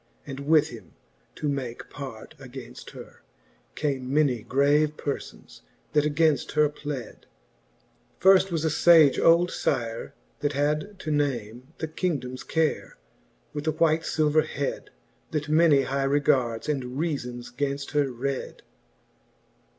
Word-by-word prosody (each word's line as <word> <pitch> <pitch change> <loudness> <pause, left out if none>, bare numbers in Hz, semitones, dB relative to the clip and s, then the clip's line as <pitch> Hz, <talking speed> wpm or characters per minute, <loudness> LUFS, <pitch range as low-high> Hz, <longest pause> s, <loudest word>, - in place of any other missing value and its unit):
And 135 -1 -7
with 155 -1 +4
him 105 - -12 0.4
to 150 - -3
make 130 -4 -4
part 130 -6 -8
againft 130 -2 -10
her, - - -12 0.5
came 135 -4 -2
Many 140 -5 +2
grave 145 +5 +2
perfons, 140 - -6 0.3
that 150 -1 +3
againft 150 -2 +1
her 150 -1 +4
pled: 145 -5 -7 0.9
Firft 190 +1 +6
was 165 -2 -1
a - - +3 0.2
iage 155 -5 +7
old 170 +2 +5
Syre, 115 -4 -2 0.3
that 145 0 -1
had 150 +8 -1
to 155 - -3
name 130 -4 -2
The 160 - -3
Kingdomes 145 -7 -3
Care., 160 -1 -1 0.6
with 150 +1 -5
a - - +4
white 160 0 +2
filver 155 -1 +2
hed, 140 -2 -4 0.4
That 150 0 -3
many 155 -3 +5
high 135 0 -1
regards 130 -5 +1
and 130 -4 -2
reafbns 125 -7 -3
gainft 140 +1 -2
her 145 -3 +1
red. 130 +2 -4
145 Hz, 130 wpm, -26 LUFS, 130-155 Hz, 0.9 s, iage